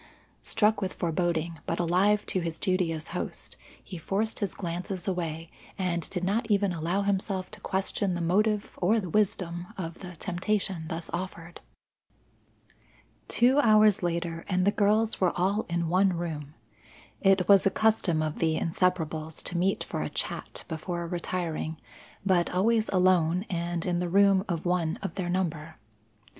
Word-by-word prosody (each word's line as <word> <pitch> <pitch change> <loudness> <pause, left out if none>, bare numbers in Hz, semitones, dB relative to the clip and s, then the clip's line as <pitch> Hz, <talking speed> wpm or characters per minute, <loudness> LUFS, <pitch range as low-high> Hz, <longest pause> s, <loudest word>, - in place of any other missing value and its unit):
Struck 215 -1 +2
with 190 -1 -2
foreboding, 170 -1 -1
but 165 - -1
alive 190 +5 +3
to 185 - 0
his 165 -2 -3
duty 185 -3 +1
as 160 -1 -5
host, - - -4 0.3
he 180 - -8
forced 205 +7 -1
his 200 -4 -2
glances 180 +1 -4
away, 165 -3 -3 0.3
and 175 -3 -1
did 180 -2 -4
not 220 +5 0
even 200 -2 +2
allow 175 +4 -1
himself 195 -1 -1
to 215 - -8
question 190 -1 -1
the - - -3
motive 205 +5 +1
or 210 +6 +3
the 185 -5 -5
wisdom 180 -4 0
of 165 -3 -5
the 180 -2 -9
temptation 185 0 -2
thus 165 0 -5
offered. 175 -1 -6 1.7
Two 255 +4 +4
hours 215 -4 +5
later 170 -1 -2
and 185 -1 +2
the 200 - +4
girls 215 +2 +2
were 180 -2 +2
all 195 +5 +1
in 170 0 0
one 185 +2 +3
room. 155 -4 -5 0.7
It 195 -2 +4
was 200 -1 +6
a - - +5
custom 190 -6 +2
of 155 -1 -3
the 160 -1 +2
Inseparables 160 -2 -1
to 180 - -1
meet 185 +3 +1
for - - -4
a - - -2
chat - - -4
before 170 +1 -4
retiring, 170 -2 -3 0.5
but 180 -3 +3
always 220 +4 +2
alone 180 -1 +3
and 170 -1 -2
in 175 -2 0
the 175 -1 -1
room 195 +1 +4
of 170 -1 -2
one 175 -2 0
of - - -3
their 185 -3 -3
number. 165 -4 -2
180 Hz, 160 wpm, -28 LUFS, 170-195 Hz, 1.7 s, was